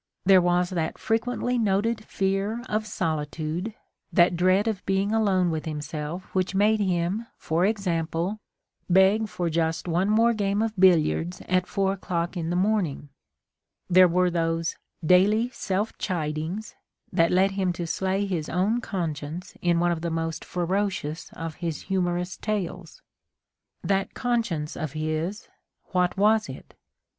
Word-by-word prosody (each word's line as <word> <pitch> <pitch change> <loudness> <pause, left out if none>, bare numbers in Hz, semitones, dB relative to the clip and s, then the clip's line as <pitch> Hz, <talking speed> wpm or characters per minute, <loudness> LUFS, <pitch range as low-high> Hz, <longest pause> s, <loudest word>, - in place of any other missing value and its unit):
There 190 -1 +7
was 175 0 +2
that 165 -3 -2
frequently 245 +2 0
noted 220 +2 +1
fear_of_sditude, 195 -5 -2 0.4
that 175 -2 +4
dread 185 +4 +3
of 215 -4 -2
being 195 +1 +1
alone 195 -5 +2
with 160 -1 -3
himself 155 +2 -4
which 185 0 0
made 215 +2 +3
him, 190 +3 0
for 170 +4 +1
example, 180 -1 -1 0.5
beg 190 +4 +4
for 180 -1 -2
just 165 +1 -1
one 175 +4 +1
more 230 +2 +4
game 205 0 0
of 225 -1 -2
billiards 180 -1 +3
at 185 0 +1
4 195 -1 0
o'clock 175 -2 -3
in 165 -2 -2
the 175 - -1
morning^ 180 -7 0 0.8
There 185 +1 +8
were 180 +1 +2
those 165 -1 0 0.3
"daily 210 +8 +4
self 205 -1 -2
chidings" 165 +3 -3 0.4
that 170 -2 +4
led 190 +2 +3
him 190 -2 0
to 175 0 -4
slay 190 +4 0
his 170 -6 -3
own 205 +7 +1
conscience 165 -3 -4
in 170 -1 +2
one 175 0 +2
of 165 -2 -2
the 170 - -2
most 165 -1 -3
ferocious 180 -3 -2
of 165 -1 -6
his 165 -3 -3
hmnorous 180 -1 -1
tales. 185 -5 -4 0.8
That 195 -1 0
conscience 225 -11 -1
of 155 -3 -4
his 155 +6 -3 0.2
— - - -55
what 180 -1 +1
was 215 +2 +3
it? - - -10
180 Hz, 140 wpm, -26 LUFS, 165-200 Hz, 0.8 s, There